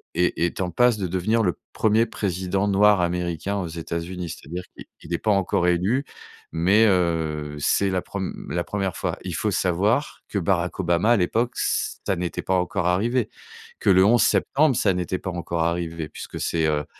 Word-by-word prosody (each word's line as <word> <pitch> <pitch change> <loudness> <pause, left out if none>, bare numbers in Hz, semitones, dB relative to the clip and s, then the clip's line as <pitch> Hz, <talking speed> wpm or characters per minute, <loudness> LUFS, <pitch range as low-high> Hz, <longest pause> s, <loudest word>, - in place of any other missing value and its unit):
est 90 0 +2
est 85 +2 0
en 90 - -1
passe 120 +4 +3
de 95 - -1
devenir 95 +6 +1
le 90 -4 0 0.2
1er 110 +1 +3
président 95 -2 -2
noir 100 -1 +5
américain 90 +2 -1
aux 95 -3 -2
États-Unis. 85 +2 -5
C'est-à-dire 85 +4 -7
qu'il - - -11 0.2
il 85 +2 -7
est - - +2
pas 110 - 0
encore 95 -2 +1
élu, 95 +11 +1 0.5
mais, 95 +7 +4
heu, 80 -5 0
c'est 100 +6 +2
la 95 -1 0
prem 95 -2 -5 0.2
la 85 - -1
1re 95 -1 -3
fois. - - -2
Il 90 - -4
faut 105 +4 0
savoir 100 - 0
que 100 - -1
Barack 90 0 0
Obama, 85 +5 +2
à 120 - +5
l'époque, 115 +7 0
ç - - -1
ça 95 - +2
n'était 85 0 -3
pas 95 - 0
encore 90 -1 0
arrivé, 110 +6 +1 0.5
que - - +1
le 95 0 +6
11 120 +3 +5
septembre, 145 -2 +3
ça 100 -4 +2
n'était 90 +1 -2
pas 95 - -4
encore 85 -1 -2
arrivé 85 -2 -2
puisque - - -8
c'est, 80 -2 0
heu, 75 -1 0
90 Hz, 190 wpm, -24 LUFS, 85-100 Hz, 0.5 s, le